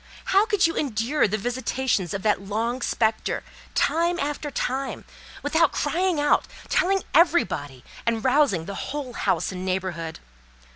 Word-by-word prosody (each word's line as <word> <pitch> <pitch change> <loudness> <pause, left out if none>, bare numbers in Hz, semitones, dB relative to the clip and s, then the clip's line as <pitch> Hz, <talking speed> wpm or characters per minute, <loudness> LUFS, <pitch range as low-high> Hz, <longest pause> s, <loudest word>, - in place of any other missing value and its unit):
How 400 +3 +5
could 415 -5 +3
you 330 - +1
endure 255 +1 +1
the 210 +1 -1
visitations 245 -4 -1
of 195 - -4
that 210 -3 +2
long 225 +5 -2
spectre, 220 -2 0 0.3
time 340 +2 +2
after 295 +1 -2
time, 265 0 -3 0.4
without 320 +3 +3
crying 345 +2 0
out, 290 - +3 0.2
telling 385 +1 +2
everybody, 275 - +2 0.2
and 230 -1 0
rousing 260 - +3
the 200 - -5
whole 265 +4 -5
house - - 0
and 185 -1 -5
neighbourhood? 185 -3 -3
255 Hz, 140 wpm, -25 LUFS, 200-305 Hz, 0.4 s, How